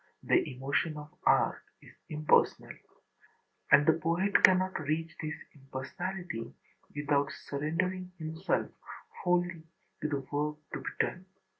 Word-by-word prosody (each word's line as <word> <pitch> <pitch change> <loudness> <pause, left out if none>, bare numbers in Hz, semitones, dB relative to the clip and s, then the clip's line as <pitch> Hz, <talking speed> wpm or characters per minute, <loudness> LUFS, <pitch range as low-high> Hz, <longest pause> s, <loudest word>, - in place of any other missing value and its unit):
The - - +2
emotion 140 +4 0
of 150 +1 -9 0.2
art - - +4 0.2
is - - -16 0.2
impersonal. 155 0 +2 1.0
And 145 - +8
the 160 - +6
poet 170 +5 +2
cannot 185 0 +5
reach 160 +2 -2
this 155 0 -3 0.2
impersonality 135 +1 -5 0.4
without 145 0 +1
surrendering 180 +7 -2
himself 160 +3 -1 0.5
wholly 175 -2 +1 0.4
to 150 - 0
the 140 -2 -1
work 150 +1 -1 0.2
to - - -2
be - - -4
done. 185 +1 -1
155 Hz, 120 wpm, -31 LUFS, 145-180 Hz, 1.0 s, And